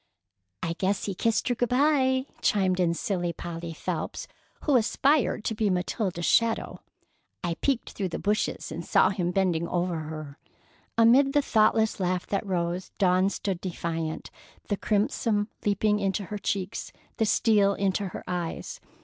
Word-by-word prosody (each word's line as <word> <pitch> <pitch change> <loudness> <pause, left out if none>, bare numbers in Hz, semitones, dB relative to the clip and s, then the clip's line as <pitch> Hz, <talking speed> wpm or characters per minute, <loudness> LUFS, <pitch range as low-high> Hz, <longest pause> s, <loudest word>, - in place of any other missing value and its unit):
"I 165 - -1
guess 195 +1 0
he 200 - -2
kissed 225 +4 0
her - - +3
good 245 0 -1
by," 260 -1 +3 0.2
chimed 190 -3 +2
in 170 -2 +2
silly 175 -2 -1
Polly 170 0 -6
Phelps, 160 - -4 0.4
who 290 - +3
aspired 255 +1 +2
to 225 - -1
be 215 -1 +1
Matilda's 180 -1 -1
shadow. 230 -1 +2 0.6
"I 175 -1 0
peeked 270 -4 0
through 195 -3 -3
the - - -4
bushes 210 -5 -1
and 165 +2 -5
saw 185 - +4
him 180 -3 -1
bending 175 -3 +1
over 175 -1 -1
her." 155 -2 -7 0.6
Amid 255 +5 +5
the 290 - +3
thoughtless 220 -1 +3
laugh 180 -1 0
that 200 - -1
rose, 175 0 -2
Dawn 185 0 +3
stood 195 -3 -3
defiant, 165 -3 -4 0.4
the 205 - +2
crimson 210 +1 0
leaping 210 +1 +2
into 200 0 -1
her 210 +2 -5
cheeks, 195 -1 -3 0.3
the 220 - +2
steel 205 -3 +3
into 195 0 0
her - - -7
eyes. 175 -2 -4
195 Hz, 155 wpm, -27 LUFS, 175-220 Hz, 0.6 s, Amid